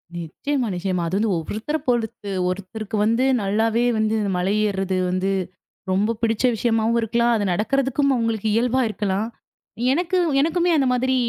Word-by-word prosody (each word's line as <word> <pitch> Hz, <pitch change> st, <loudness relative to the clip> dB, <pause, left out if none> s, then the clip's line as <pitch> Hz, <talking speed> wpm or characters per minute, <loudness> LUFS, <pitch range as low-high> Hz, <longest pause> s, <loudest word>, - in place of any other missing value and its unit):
நிச்சயமா, 240 Hz, -, -2 dB
நிச்சயமா. 180 Hz, -1 st, -1 dB
அது 185 Hz, +4 st, -1 dB
வந்து 215 Hz, 0 st, +1 dB
ஒவ்வொருத்தர 215 Hz, -, -3 dB
பொறுத்து. 220 Hz, -4 st, -1 dB, 0.2 s
ஒருத்தருக்கு 200 Hz, +4 st, -5 dB
வந்து 230 Hz, +3 st, +2 dB, 0.2 s
நல்லாவே 220 Hz, +4 st, +1 dB
வந்து 215 Hz, 0 st, +1 dB, 0.2 s
மலை 185 Hz, +3 st, 0 dB
ஏர்றது 190 Hz, -2 st, -1 dB
வந்து 185 Hz, +2 st, 0 dB, 0.6 s
ரொம்ப 210 Hz, +5 st, +1 dB
பிடிச்ச 225 Hz, -1 st, 0 dB
விஷயமாவும் 225 Hz, 0 st, +1 dB
இருக்கலாம். 235 Hz, +2 st, +2 dB
அது 215 Hz, -, 0 dB
நடக்குறதுக்கும் 275 Hz, +6 st, +1 dB
அவங்களுக்கு 225 Hz, -3 st, -1 dB
இயல்பா 250 Hz, +3 st, +2 dB
இருக்கலாம். 205 Hz, 0 st, -1 dB, 0.7 s
எனக்கு 350 Hz, +4 st, 0 dB, 0.2 s
எனக்குமே 345 Hz, +3 st, +1 dB
அந்த 270 Hz, -3 st, +2 dB
மாதிரி 260 Hz, +1 st, +1 dB
220 Hz, 140 wpm, -22 LUFS, 195-245 Hz, 0.7 s, வந்து